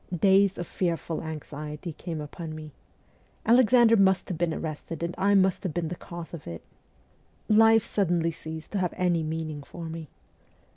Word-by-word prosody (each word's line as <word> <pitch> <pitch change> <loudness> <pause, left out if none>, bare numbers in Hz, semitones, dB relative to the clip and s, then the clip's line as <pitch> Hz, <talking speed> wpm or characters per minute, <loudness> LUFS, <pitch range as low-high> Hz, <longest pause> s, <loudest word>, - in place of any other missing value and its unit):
Days 195 +1 +4
of 175 - -3
fearful 170 -2 -2
anxiety 155 0 -6
came 165 -1 -5
upon 155 +2 -7
me. 155 -1 -8 0.7
Alexander 235 0 +6
must 190 -2 +3
have 180 - -3
been 170 -1 +1
arrested, 160 +1 -5
and 170 +1 -2
I 200 +2 +3
must 190 -1 +3
have 185 -6 -4
been 170 -2 -1
the 180 - -4
cause 170 0 -9
of 165 - -8
it! 85 -1 -7 0.8
Life 225 0 +6
suddenly 175 -4 +1
ceased 160 -1 -8
to 205 - -1
have 180 -2 -1
any 175 -2 +2
meaning 155 -1 -4
for 170 +4 -9
me. 160 -2 -7
170 Hz, 165 wpm, -27 LUFS, 160-190 Hz, 0.8 s, Alexander